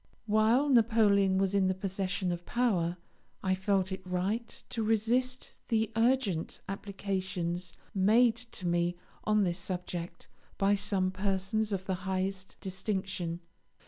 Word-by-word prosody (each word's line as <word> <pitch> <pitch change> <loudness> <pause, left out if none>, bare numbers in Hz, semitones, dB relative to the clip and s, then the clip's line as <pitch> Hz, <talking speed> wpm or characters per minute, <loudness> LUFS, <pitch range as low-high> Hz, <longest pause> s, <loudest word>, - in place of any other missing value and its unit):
While 225 +6 +3
Napoleon 215 -6 +4
was 195 0 +1
in 195 -2 +3
the 185 - +1
possession 190 -1 -2
of 175 0 -4
power 180 -8 +1 0.5
I 190 - +2
felt 190 0 +1
it 190 - -4
right 190 +6 -2
to 230 - -3
resist 235 +4 +1
the 225 -1 +1
urgent 225 -8 +1
applications 190 -3 -3 0.2
made 220 +4 +5 0.2
to 185 - -6
me 175 0 +1 0.3
on 215 -1 +3
this 175 -1 0
subject 180 -1 -5 0.3
by 195 +1 +3
some 195 -2 0
persons 195 +2 -1
of 190 -1 -2
the 190 - 0 0.2
highest 190 0 -2
distinction. 190 -3 -3
195 Hz, 130 wpm, -31 LUFS, 185-215 Hz, 0.5 s, made